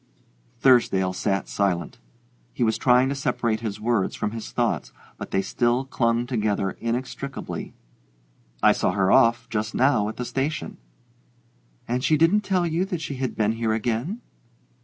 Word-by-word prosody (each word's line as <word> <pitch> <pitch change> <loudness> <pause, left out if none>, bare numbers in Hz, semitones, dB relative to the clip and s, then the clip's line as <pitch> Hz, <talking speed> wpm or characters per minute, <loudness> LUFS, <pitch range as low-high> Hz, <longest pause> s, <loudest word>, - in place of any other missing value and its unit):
Thursdale 95 -8 +4
sat 95 +1 -1
silent. 100 +5 -1 0.5
He 125 - -1
was 110 -1 +1
trying 125 0 +4
to - - 0
separate 125 -5 -1
his 110 -2 -5
words 110 -3 0
from 105 - -2
his 115 -1 -7
thoughts, - - -1 0.3
but - - -6
they 95 - 0
still 120 +6 0
clung 115 -2 0
together 105 -6 -1
inextricably. 125 +3 -5 0.9
"I - - +7
saw - - 0
her 95 -1 +2
off 115 +1 +4
just 110 -2 -3
now 125 -6 +3
at 110 - -8
the 125 - -3
station." 140 +5 -3 1.1
"And 125 +2 -1
she 155 - +3
didn't 165 +7 +4
tell 190 -3 0
you 170 +2 0
that 180 -3 -3
she 140 -3 -5
had 130 -1 -3
been 110 -1 +1
here 115 -1 -1
again?" 120 - -2
120 Hz, 160 wpm, -24 LUFS, 110-135 Hz, 1.1 s, I